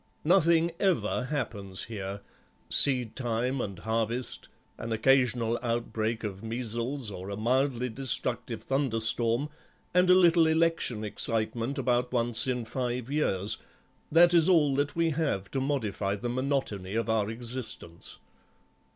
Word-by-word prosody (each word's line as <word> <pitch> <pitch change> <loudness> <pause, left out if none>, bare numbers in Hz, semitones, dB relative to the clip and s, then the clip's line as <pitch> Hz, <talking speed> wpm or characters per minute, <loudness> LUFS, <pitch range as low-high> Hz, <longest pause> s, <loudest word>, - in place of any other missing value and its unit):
Nothing 170 -1 +4
ever 125 - +1
happens 105 -9 -4
here; 100 -2 -6 0.5
seedtime 125 -1 +2
and 100 -4 -5
harvest, 115 +5 -2 0.3
an 115 0 -5
occasional 120 0 +2
outbreak 115 -1 -2
of 100 -3 -5
measles 115 +2 -3
or 95 0 -7
a 100 - -5
mildly 125 +2 +1
destructive 130 +1 -2
thunderstorm, 120 -1 +1 0.5
and 180 +1 +4
a 180 - +8
little 170 -3 +5
election 160 -8 +1
excitement 115 +4 -1
about 125 -2 0
once 120 0 +1
in 125 -2 -1
five 125 +1 -3
years, 110 -8 +1 0.5
that 170 +2 +6
is 170 0 +6
all 155 -6 +4
that 145 +1 -1
we 165 -1 +1
have 140 -12 -2
to 135 - -1
modify 110 -8 -1
the 120 +4 -4
monotony 125 -7 -2
of 115 0 0
our 110 -2 +1
existence. 115 -7 -4
120 Hz, 125 wpm, -28 LUFS, 110-140 Hz, 0.5 s, a